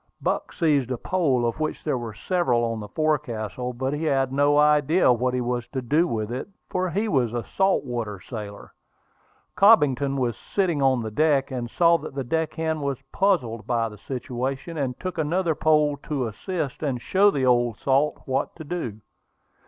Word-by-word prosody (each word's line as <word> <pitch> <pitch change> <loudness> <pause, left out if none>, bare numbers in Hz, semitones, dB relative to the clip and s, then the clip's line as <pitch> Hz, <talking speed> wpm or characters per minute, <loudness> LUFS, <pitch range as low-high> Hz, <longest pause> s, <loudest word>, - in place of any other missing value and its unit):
Buck - - -2
seized 145 -7 +1
a 125 - -2
pole, 140 -7 +1
of 120 +5 -2
which 155 0 -3
there 150 - 0
were 115 -3 -6
several 125 - +1
on 115 -1 -1
the 105 - -7
forecastle; 125 -5 -2
but 130 +3 -3
he 150 +2 -2
had 135 -3 +1
no 145 +1 +3
idea 150 0 +4
what 125 +1 0
he 125 - 0
was 120 0 -2
to 130 +1 -4
do 155 +8 +2
with 110 -5 -3
it, 125 - -4 0.2
for 185 0 0
he 205 +6 -1
was 125 - +1
a 120 - -2
salt 190 -5 +1
water 115 -5 -4
sailor. 105 -2 -8 0.8
Cobbington 145 - +4
was 125 -3 0
sitting 175 -7 -1
on 130 -3 +3
the 110 - -5
deck, 145 +2 +2
and 120 -2 -4
saw 170 +5 +4
that 150 -2 -8
the 135 - -2
deck 160 +4 -1
hand 160 -1 -1
was 140 -2 -2
puzzled 125 - 0
by 115 -2 0
the 105 -1 -13
situation, 130 - -4
and 135 -4 -3
took 185 -2 -4
another 165 +2 +1
pole 150 -1 +2
to 140 -2 -3
assist 140 - -4
and 135 -5 -1
show 195 +10 +4
the 140 -8 0
old 120 -2 +2
salt 140 +2 +1
what 135 0 -1
to 160 - -8
do. 145 -10 -5
135 Hz, 190 wpm, -24 LUFS, 120-155 Hz, 0.8 s, idea